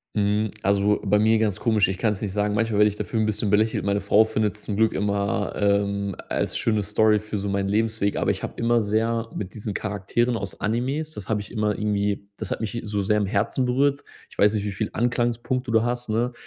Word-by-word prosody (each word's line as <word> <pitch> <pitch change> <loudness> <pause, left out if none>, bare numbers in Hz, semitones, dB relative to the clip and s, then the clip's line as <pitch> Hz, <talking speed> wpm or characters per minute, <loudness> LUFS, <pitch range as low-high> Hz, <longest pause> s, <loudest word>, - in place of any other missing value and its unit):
Mhm, 105 +1 +1
also, 100 +1 +2
bei 105 +1 +3
mir 110 +1 +4
ganz 105 -2 0
komisch. 110 -4 +3
Ich 95 -1 -3
kann 110 0 +1
es 95 - -9
nicht 100 -3 -2
sagen, 105 +1 0
manchmal 110 0 0
werde 105 0 +6
ich 105 - -5
dafür 110 +1 -2
'n 110 - +2
bisschen 105 -1 -1
belächelt. 110 +2 +2
Meine 100 0 +1
Frau 105 +2 +4
findet's 110 -1 -2
zum 105 - -4
Glück 110 +1 +2
immer, 100 0 -1
ähm, 100 -1 0
a - - -7
als - - -1
schöne 110 -2 +1
Story 105 +1 +3
für 105 0 -5
so 100 0 -3
meinen 100 0 0
Lebensweg, 110 0 0
aber - - +1
ich - - -2
habe - - -5
immer 120 0 +2
sehr 115 +2 0
mit 95 -1 -5
diesen 105 -1 -5
Charakteren 110 +4 -1
aus 100 -2 -6
Animes, 130 +8 -1
das 105 -11 -8
habe 110 -2 0
ich 105 - -12
immer 105 -2 0
irgendwie, 100 -1 -1
das - - -5
hat - - -2
mich 110 - -3
hi 120 - -3
so 105 -1 -1
sehr 105 +2 +2
am 105 - 0
Herzen 105 +6 +1
berührt. 140 +3 +1 0.3
Ich - - -18
weiß 105 +1 +4
nicht, 105 -2 -1
wie 105 - -2
viel 105 +2 -2
Anklagepunkte 120 +1 -1
du 110 -1 +4
hast, 120 0 -2
ne? 115 +3 0
105 Hz, 240 wpm, -24 LUFS, 100-115 Hz, 0.3 s, werde